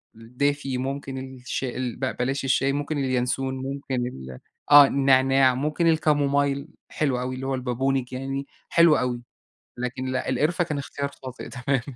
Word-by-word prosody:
الدافي، 135 +3 -2
ممكن 135 +1 -4
الشي 130 -1 -5
ال 125 -3 -3
ب 130 - -2
بلاش 135 +2 -1
الشاي، 135 +1 +2
ممكن 145 +1 -2
الينسون، 130 0 0
ممكن 135 -1 -4
ال 65 - -8 0.3
آه، 145 -1 +11
النعناع 135 -1 +4
ممكن 150 +5 0
الكامومايل، 145 -2 +2 0.2
حلو 135 -5 0
أوي 130 0 -3
اللي 130 +1 -6
هو 135 - 0
البابونج 130 0 -1
يعني، 135 +2 -4 0.2
حلو 170 -2 +6
أوي، 125 -1 -1 0.6
لكن 125 +1 -4
لأ، 130 0 -2
القِرفة 155 +7 +1
كان 150 -3 -3
اختيار 140 0 -4
خاطئ 130 -1 -7
تمامًا. 125 +1 -1
135 Hz, 150 wpm, -25 LUFS, 130-140 Hz, 0.6 s, آه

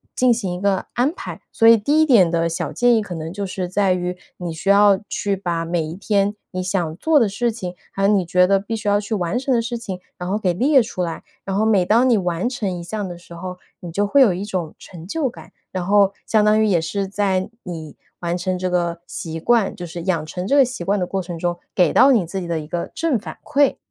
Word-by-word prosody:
进 250 -1 +3
行 205 -6 -1
一 180 - -6
个 195 -2 +1
安 255 +5 +2
排。 - - -8
所 225 - +3
以 230 - +9
第 285 +9 +1
一 315 - +5
点 210 - +5
的 165 0 +1
小 165 - -3
建 245 -1 +3
议 220 - +2
可 190 -4 -6
能 160 +1 -6
就 200 0 -4
是 185 -1 -4
在 190 0 +2
于， 180 0 -2 0.2
你 175 -2 -5
需 165 +5 -3
要 200 -1 +6
去 200 -1 -1
把 170 -3 -2
每 170 0 -1
一 155 +1 -5
天 200 +1 0 0.2
你 185 0 -3
想 180 -4 -1
做 315 +4 +3
的 230 - +3
事 235 +4 -1
情， 185 -6 -6 0.2
还 195 - -3
有 - - +5
你 200 -3 +3
觉 180 +2 +3
得 195 +1 +3
必 210 +4 -4
须 220 -1 -5
要 205 0 +3
去 210 +1 -3
完 180 +4 -1
成 270 +1 -2
的 - - +3
事 235 +1 -3
情， 190 -5 -6 0.2
然 180 +1 -4
后 205 - +1
给 185 -4 0
列 265 - +4
出 215 -5 -5
来， 170 -2 -3 0.2
然 195 0 -2
后 215 - +2
每 210 -4 +4
当 225 +7 +3
你 235 -4 +4
完 180 +3 -1
成 220 -6 -2
一 - - -7
项 205 +2 -4
的 175 - -7
时 170 0 -14
候， 180 +2 -7 0.2
你 175 -2 -8
就 205 +4 0
会 280 +7 +4
有 235 -8 +6
一 185 +3 -4
种 180 -6 -4
成 170 -2 -11
就 280 +4 -1
感， - - -14 0.2
然 185 -2 -3
后 200 0 +4
相 215 -2 +3
当 215 +1 +4
于 - - +4
也 185 -6 +3
是 195 +4 -2
在 195 -1 0
你 160 -4 -7 0.2
完 175 0 -2
成 185 +1 -2
这 185 0 -1
个 170 -1 -1
习 165 -1 -5
惯 225 +3 +2
就 175 - -7
是 170 +1 -7
养 170 -4 0
成 180 +3 -5
这 275 - +2
个 275 - +7
习 250 -7 -6
惯 200 +3 +1
的 180 - 0
过 195 +1 -2
程 175 -2 -6
中 175 0 -1 0.2
给 180 -3 +3
到 270 +2 +6
你 220 -8 +3
自 190 +4 -4
己 175 - -6
的 165 -1 -1
一 150 - -8
个 170 0 -4
正 320 -7 0
反 210 - -8
馈， 285 -1 +2
190 Hz, 285 characters per minute, -21 LUFS, 175-220 Hz, 0.2 s, 以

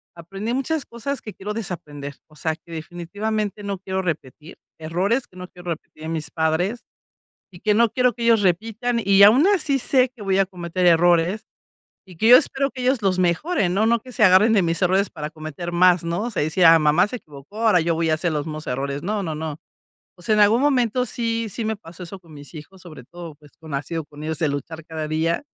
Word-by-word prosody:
aprendí 195 +7 -5
muchas 275 +2 -1
cosas 250 +4 -5
que 215 - -8
quiero 210 +2 -6
desaprender. 145 -9 -6
O 155 - -21
sea, 160 +1 -2
que 170 - -19
definitivamente 205 +6 -4
no 200 -2 -4
quiero 190 0 -3
repetir 155 -1 -6 0.2
errores 185 +10 -1
que 185 - -20
no 180 - -8
quiero 175 -1 -8
repetir 155 0 -9
en 160 - -4
mis 160 -2 -3
padres 165 +8 -1 0.7
y 175 - -14
que 210 0 +2
no 230 0 +3
quiero 250 -1 +2
que 235 - -7
ellos 230 -2 +4
repitan, 225 +6 0
y 200 0 +6
aun 245 +9 +6
así 300 -9 +1
sé 255 +1 +3
que 230 - -12
voy 195 -1 +1
a 195 - +3
cometer 180 0 -3
errores, 175 +4 +3 0.6
y 180 -3 -15
que 220 - +2
yo 245 - +10
espero 275 0 +2
que 260 -2 -8
ellos 255 -1 +1
los 190 -2 +1
mejoren, 185 - +1
¿no?, 205 +3 +2
no 230 0 +2
que 255 - -12
se 235 - +1
agarren 190 +4 +6
de 215 -3 +4
mis 170 +1 -1
errores 190 +2 +2
para 150 -1 -6
cometer 155 +2 -7
más, 180 0 +4
¿no?, 170 +8 -2
se 200 - -1
decía 165 +2 +5
mamá 155 +5 +3
se 250 - -6
equivocó, 150 - -11
ahora 220 -5 +4
yo 165 0 0
voy 165 0 0
a 155 - +3
hacer 170 0 -2
los 150 -1 -2
mismos 155 -1 -7
errores. 140 +2 -3
No, 205 +2 -2
no, 160 -3 -4
no, 155 -1 -5 0.6
o - - -16
sea, 215 +5 +1
en 210 - +3
algún 215 +4 +4
momento 250 -3 +1
sí 230 -1 -2
sí 220 +3 -4
me 220 0 -1
pasó 180 -2 -12
eso 190 +2 -8
con 165 -4 -16
mis 145 +2 -12
hijos, 175 +4 -12
sobre 155 -8 -12
todo, 170 +2 -10
pues, 150 -1 -20
como 160 -4 -9
ha - - -1
sido 165 +1 -5
con 145 0 -13
ellos 155 0 -3
de 160 - +1
luchar 150 +3 -5
cada 160 -1 -5
día. 165 - -1
180 Hz, 230 wpm, -22 LUFS, 160-220 Hz, 0.7 s, yo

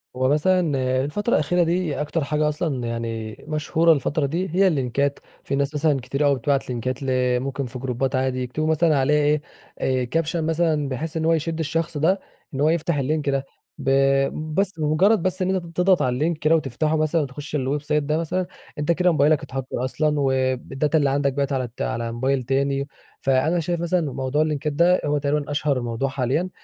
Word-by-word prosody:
هو 130 +1 +1
مثلًا 180 +6 +3 0.5
الفترة 205 +11 -1
الأخيرة 175 +4 +2
دي 170 -3 -1
أكتر 150 +1 -1
حاجة 150 +1 +1
أصلًا 145 -6 -2
يعني 115 -2 -4
مشهورة 155 +2 +3
الفترة 145 +1 0
دي 170 +6 -2
هي 195 +1 +5
اللينكات، 140 -2 0 0.2
في 140 - -2
ناس 140 +1 0
مثلًا 150 -2 +2
كتير 140 +4 -1
أوي 140 -1 +4
بتبعت 135 +2 -1
لينكات 125 +2 -3
ل 125 -1 +1
ممكن 135 +1 -3
في 125 +1 -7
جروبات 130 +1 -1
عادي 130 -1 0
يكتبوا 150 +5 -2
مثلًا 160 -1 +3
عليه 150 +2 +2 0.4
إيه، 130 -1 +1
كابشن 165 +2 0
مثلًا 160 -3 +1
بحيث 155 +5 -4
إن 160 - -1
هو 165 - +4
يشد 165 +1 -2
الشخص 160 +1 -2
ده 175 +6 +2 0.3
إن 135 - -2
هو 155 - +4
يفتح 165 -1 0
اللينك 145 +2 0
ده 135 0 0 0.3
ب 135 -3 -2 0.7
بس 195 -3 0
بمجرد 165 +7 +3
بس 185 +1 -1
إن 190 +1 +1
أنت 180 -2 -2
تضغط 180 0 +4
على 125 - +1
اللينك 155 +5 0
كده 155 +1 +3
وتفتحه 155 +1 0
مثلًا 155 +1 +1
وتخش 145 +2 -6
الويب 140 +1 -1
سايت 150 0 0
ده 150 +2 0
مثلًا 180 +3 -1 0.3
أنت 150 +3 +1
كده 180 +1 +3
موبايلك 150 -1 +3
اتهكر 130 -1 -4
أصلًا 150 +3 0
والداتا 135 +2 0
اللي 145 -3 +2
عندك 140 0 +1
بقِت 140 0 -1
على 130 -2 -1
ت - - -6
موبايل 120 +4 -1
تاني، 140 +2 0 0.3
فأنا 135 +6 +2
شايف 170 +1 -2
مثلًا 170 -4 0
موضوع 135 +3 0
اللينكات 150 -1 -1
ده 175 +4 +3
هو 150 0 +1
تقريبًا 145 +1 -1
أشهر 145 -3 0
موضوع 120 +3 -2
حاليًا، 140 +7 -1
145 Hz, 190 wpm, -23 LUFS, 135-160 Hz, 0.7 s, هي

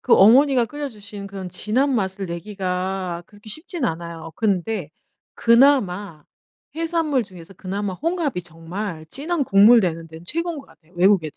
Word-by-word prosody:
그 - - +4
어머니가 250 +5 +6
끓여 290 +3 -5
주신 205 -3 -9
그런 195 -2 -7
진한 255 +10 0
맛을 195 -3 -1
내기가 185 0 -3
그렇게 205 +1 -16
쉽진 315 - -3
않아요. 165 -1 -4
근데 200 -5 -1 0.4
그나마 210 - +3 0.5
해산물 325 -6 0
중에서 185 -1 -13
그나마 195 +2 -4
홍합이 320 - -1
정말 165 +1 -6
진한 295 - -2
국물 225 +1 +7
내는 165 -3 -2
데는 160 +1 -12
최고인 335 - -2
것 - - -11
같아요 165 +1 -24
외국에도 175 -4 +3
200 Hz, 340 characters per minute, -22 LUFS, 175-260 Hz, 0.5 s, 국물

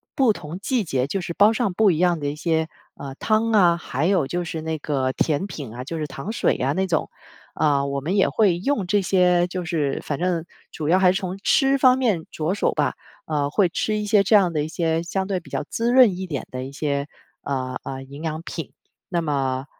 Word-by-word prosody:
不 255 -5 +4
同 165 -1 -8
季 240 +3 0
节 135 -7 -1
就 195 +6 -2
是 170 0 -5
煲 205 +5 +5
上 220 -4 0
不 210 +1 +4
一 160 - -1
样 175 -1 +2
的 145 - -3
一 145 - -3
些， 160 0 0 0.3
呃， 135 -1 -8
汤 220 +6 +1
啊， 175 -5 +5
还 145 -3 -3
有 180 -7 +2
就 175 +4 -2
是 160 -1 -5
那 160 0 -3
个 135 -3 -1
甜 155 +7 0
品 140 - -7
啊， 125 +1 -6
就 165 +4 -5
是 155 - -2
糖 135 +8 -6
水 - - +1
呀 135 +2 0
那 190 +4 0
种。 165 -4 0 0.5
呃， 140 -2 +2
我 140 0 -2
们 170 +8 -1
也 200 - +3
会 195 -6 +2
用 215 0 0
这 205 +2 +2
些 180 -2 +3
就 180 0 -5
是 155 -6 -1
反 145 - -3
正 175 -2 -1 0.3
主 155 - -4
要 180 +4 +4
还 185 -1 +5
是 190 - -1
从 185 -1 -4
吃 270 -1 +3
方 255 -1 +5
面 210 -11 0
着 160 +3 -1
手 205 - +1
吧， - - 0 0.3
呃， 145 -2 -1
会 190 +5 +3
吃 215 +5 -1
一 210 - -2
些 205 -1 +4
这 215 +3 +4
样 185 -4 +4
的 150 -2 0
一 - - -3
些 165 0 -1
相 190 +2 -2
对 195 -2 -1
比 170 - -16
较 - - -2
滋 235 +1 0
润 250 -7 +6
一 190 - -4
点 145 -6 -4
的 130 0 -4
一 135 - -7
些， 140 0 -2 0.3
呃， 130 -2 -3
呃， 135 0 -6
营 140 +3 -10
养 160 -1 -3
品， 165 -4 -6 0.4
那 175 -2 0
么 135 -4 -1
170 Hz, 255 characters per minute, -23 LUFS, 145-195 Hz, 0.5 s, 润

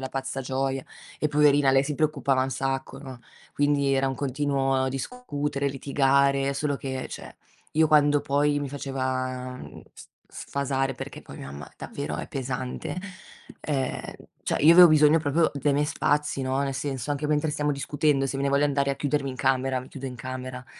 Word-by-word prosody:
alla 130 - -4
pazza 135 0 -3
gioia, 135 0 -2 0.4
e 150 - +1
poverina 145 -1 +4
lei 135 +1 +4
si 150 +1 -2
preoccupava 140 -4 +1
un 135 - -1
sacco, 135 0 -3
no, 130 -3 -10 0.3
quindi, 145 -1 +2
era 135 0 +2
un 135 - -2
continuo 135 -1 0
discutere, 145 - -3
litigare, 140 0 +2
solo 145 0 -1
che 130 -1 -4
cioè, - - -8 0.4
io 160 +1 +4
quando 145 -1 +4
poi 145 +1 +1
mi 145 -2 -4
faceva 130 -2 -3
mhmm, - - -11
s - - -12
s - - -16 0.3
sfasare 135 -1 -2
perché - - -8
poi - - -12
mia 70 - -8
mamma 70 0 -9
davvero 75 +1 -5
è - - -5
pesante. 130 +1 -4 0.6
Ehm, 135 -4 -2 0.4
cioè - - -1
io 155 +3 +8
avevo 175 0 +10
bisogno 155 +1 +5
proprio 160 +2 +2
dei 140 +1 +1
miei 145 +1 +2
spazi, 145 -1 0
no, 130 +1 0
nel 140 -1 -1
senso 140 -1 -3
anche 145 +1 -1
mentre 150 +1 +1
stiamo 150 0 -1
discutendo, 140 0 +1
se 135 - -3
me - - -1
ne - - +2
voglio 140 +1 +3
andare 140 -1 +1
a - - -1
chiudermi 145 -1 -1
in 130 - -6
camera, 130 0 +1
mi 130 - -9
chiudo 135 -1 -7
in 125 - -6
camera, 130 +1 -6
140 Hz, 190 wpm, -26 LUFS, 130-145 Hz, 0.6 s, avevo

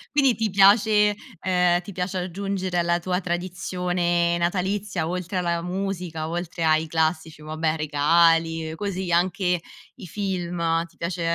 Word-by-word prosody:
quindi 275 -4 +4
ti 220 -1 -1
piace, 210 +2 +5 0.3
ehm, 180 -1 +2
ti 200 - -9
piace 185 0 -3
aggiungere 185 0 -2
alla 170 0 +1
tua 180 +1 -1
tradizione 175 -1 -1
natalizia, 185 0 -1
oltre 180 +1 -3
alla 170 -1 0
musica, 180 -3 -4
oltre 170 0 -4
ai 155 0 +3
classici 160 -1 -1
vabbè, 155 +1 -1
regali, 165 +1 +2
così, 190 -1 -3
anche 180 0 +1 0.4
i 195 -8 -10
film, 175 -3 -1
ti - - -27
piace, 170 +1 -3
175 Hz, 130 wpm, -24 LUFS, 165-190 Hz, 0.4 s, piace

